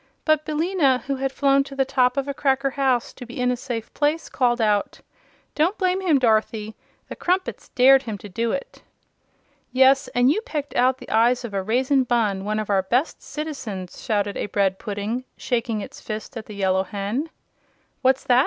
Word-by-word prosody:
But 310 -1 +2
Billina, 305 -5 +1
who 275 0 -2
had 270 0 -1
flown 275 0 +3
to 275 - -9
the 270 -1 +2
top 250 -1 +2
of 275 0 0
a 280 - -2
cracker 275 0 +1
house 260 -3 0
to - - -10
be 240 +1 -9
in 250 0 +2
a - - 0
safe 240 -3 -6
place, 300 +3 0
called 245 -2 +1
out: 210 -2 +1 0.5
"Don't 340 +7 +1
blame 370 0 +1
him, 340 -6 +3
Dorothy; 220 -3 +1 0.3
the - - -7
Crumpets 370 +1 -2
dared 265 0 +7
him 225 -6 -5
to 205 - -10
do 230 +4 -1
it." 275 - -5 0.9
"Yes, 265 +2 +4
and 245 +2 +5
you 430 - 0
pecked 300 - -5
out 255 +1 +3
the - - -11
eyes 240 +3 +3
of 220 - -7
a 195 - 0
Raisin 255 +6 +2
Bunn 215 -6 0
one 215 +1 -1
of 215 -1 -3
our 195 -1 +3
best 245 - 0
citizens!" 240 - -6
shouted 205 -3 -1
a - - -2
bread 195 -1 0
pudding, 210 +4 -3
shaking 230 -3 -1
its - - -9
fist 215 +1 -6
at 225 -2 -7
the 210 - -9
Yellow 190 -1 +2
Hen. 205 - -3 0.7
"What's 260 0 +3
that! 245 0 +4
250 Hz, 195 wpm, -23 LUFS, 215-275 Hz, 0.9 s, dared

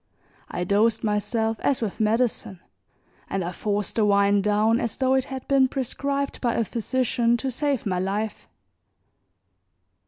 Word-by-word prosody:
I 175 - -3
dosed 210 +4 +2
myself 220 +1 0
as 275 - +1
with 220 -5 -4
medicine, 220 -3 0 0.7
and 195 -1 -1
I 175 - -3
forced 205 +3 -2
the 220 - +3
wine 200 0 +4
down 210 +3 +2
as 230 -4 -3
though 260 0 +2
it 265 -1 +2
had 265 -1 -7
been 270 -1 +4
prescribed 275 +2 -3
by 240 -2 +1
a 230 - +1
physician 240 +1 0
to 265 +2 -3
save 280 0 -1
my 185 -3 0
life. 205 +3 -3
225 Hz, 150 wpm, -24 LUFS, 205-255 Hz, 0.7 s, wine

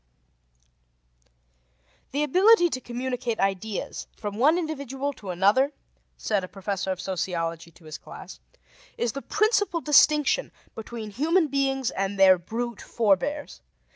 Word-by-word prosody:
D.) 275 - -4
"The 295 - +2
ability 365 +4 +5
to 255 - -3
communicate 245 -1 -3
ideas 195 +1 -2
from 205 -1 -5
one 305 +7 +4
individual 280 -4 -3
to 200 -7 -10
another," 205 +11 +3 0.4
said 205 -3 -1
a - - -5
professor 195 0 -3
of 185 - -4
sociology 170 -3 -3
to 165 0 -21
his 155 -1 -8
class, - - -11 0.6
"is 240 - 0
the 275 - -6
principal 415 -3 +1
distinction 300 - +4 0.2
between 225 -1 -7
human 315 - +2
beings 270 -2 0
and 195 +1 -3
their 190 -2 +7
brute 235 +5 -5
forbears. 235 +7 -1
240 Hz, 130 wpm, -25 LUFS, 195-290 Hz, 0.6 s, their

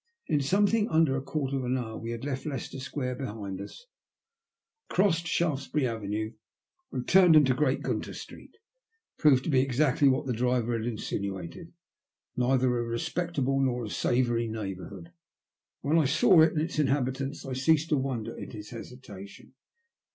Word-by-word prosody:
In 145 - +1
something 205 +8 +2
under 160 -4 +3
a 135 - -1
quarter 140 0 -2
of 130 - -3
an 125 +1 0
hour 110 -3 -5
we 115 - -6
had 115 +1 -5
left 135 0 -3
Leicester 135 -1 -5
Square 130 -1 -4
behind 105 -7 -5
us, 485 - -10 1.0
crossed 175 -3 +2
Shaftesbury 150 -4 0
Avenue, 110 -1 -3 0.6
and 125 - -4
turned 180 -3 +6
into 140 -4 +6
Great 135 0 0
Gunter - - -3
Street. - - -10
It 455 -1 -42
proved 135 -5 +5
to 165 - -2
be 130 -2 +4
exactly 135 +1 +2
what 130 +2 +1
the 130 - -1
driver 120 0 0
had 115 0 -3
insinuated, 100 - -5 0.6
neither 125 0 +2
a - - 0
respectable 135 +3 -1
nor 125 -3 0
a - - -6
savoury 120 -2 +1
neighbourhood; 95 -4 -6
and - - -31 0.8
when 165 - +6
I 155 - +3
saw 155 +5 +5
it 160 - +5
and 155 - 0
its 165 -1 -3
inhabitants 135 0 -1
I 135 - -4
ceased 155 +4 +2
to 150 - +3
wonder 130 -4 -3
at - - -8
his 105 0 -9
hesitation. 115 -5 -11
130 Hz, 165 wpm, -28 LUFS, 115-150 Hz, 1.0 s, turned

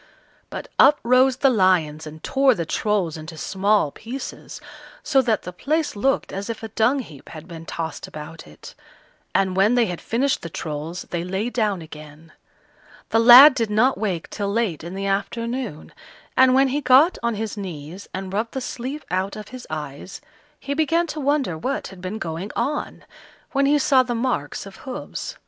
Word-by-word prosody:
But - - -6
up 290 +2 +7
rose 255 +2 +4
the 270 -1 +4
lions 170 -8 +2
and 155 +1 -11
tore 270 -2 +3
the 170 - -3
Trolls 190 -3 -1
into 160 +1 -9
small 195 -3 +1
pieces, 250 - -8 0.4
so 270 -3 +3
that 230 -5 0
the 180 - -7
place 305 - -1
looked 270 +7 0
as 200 +3 -5
if 230 0 -5
a 225 - -5
dung 240 +6 +2
heap 150 - -13
had 160 +1 -10
been 165 -2 -10
tossed 165 -1 -5
about 155 - -9
it; 75 - -13 0.6
and 190 -1 +2
when 200 +5 +4
they 240 -2 +4
had 175 -4 -5
finished 260 +4 0
the 170 - -6
Trolls 155 +2 -5
they 170 -1 -2
lay 190 +6 -2
down 210 -8 0
again. 155 +1 -12 0.8
The 225 - +3
lad 250 +5 +10
did 230 -4 -1
not 230 +6 +3
wake 185 -7 -3
till 200 -1 -2
late 205 -8 -1
in 175 +3 -7
the 195 0 -3
afternoon, 230 - -3 0.4
and 260 0 +5
when 270 0 +4
he 285 +3 -1
got 280 +7 +5
on 235 -1 0
his 220 0 -4
knees 180 -2 -8
and 190 0 -6
rubbed 220 +3 -2
the - - 0
sleep 260 +4 -5
out 185 +2 -1
of 215 -1 -9
his 255 -1 -10
eyes, 150 +3 -6 0.4
he 280 - -3
began 325 +3 +2
to 310 -1 -6
wonder 280 - 0
what 270 +10 -3
had 190 -2 -13
been 185 +4 -4
going 175 0 -5
on, 295 +1 -3 0.5
when 275 0 +2
he 295 +1 +4
saw 270 -2 +4
the 245 -1 -2
marks 230 - -2
of 195 -1 -11
hoofs. 275 - -6
210 Hz, 185 wpm, -22 LUFS, 175-255 Hz, 0.8 s, lad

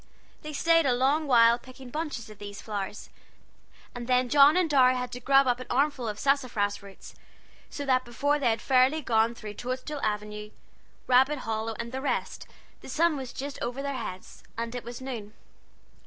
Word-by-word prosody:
They 305 - -7
staid 330 +1 +3
a 250 - +3
long 285 +5 +1
while 235 -2 +5
picking 255 0 -13
bunches 300 -6 -4
of 215 -1 -13
these 205 -1 -8
flowers, 205 -1 -6 0.8
and 240 -1 -7
then 250 -1 +2
John 290 +3 +6
and 365 -2 +3
Dorry 260 -4 +4
had 250 -1 -3
to 250 - -6
grub 275 +2 +4
up 245 -1 +1
an 255 - -8
armful 270 -2 0
of 210 -1 -4
sassafras 245 -7 0
roots; 200 -1 -13 0.6
so 285 - -6
that 255 -1 +2
before 285 +5 0
they 255 -4 +2
had 225 - -1
fairly 265 +4 +3
gone 230 -1 +2
through 215 -2 -8
Toadstool 255 +6 -5
Avenue, 210 0 -3 0.6
Rabbit 260 +3 +3
Hollow, 225 0 -2
and 235 0 -5
the 265 0 -4
rest, 285 - -3 0.3
the - - -11
sun 320 +4 +2
was 265 -3 -6
just 280 +1 -6
over 245 +3 -3
their 280 0 -2
heads, 185 -7 -7 0.2
and 230 0 -3
it 245 - -5
was 240 +2 -8
noon. 230 -5 -7
255 Hz, 185 wpm, -27 LUFS, 230-275 Hz, 0.8 s, John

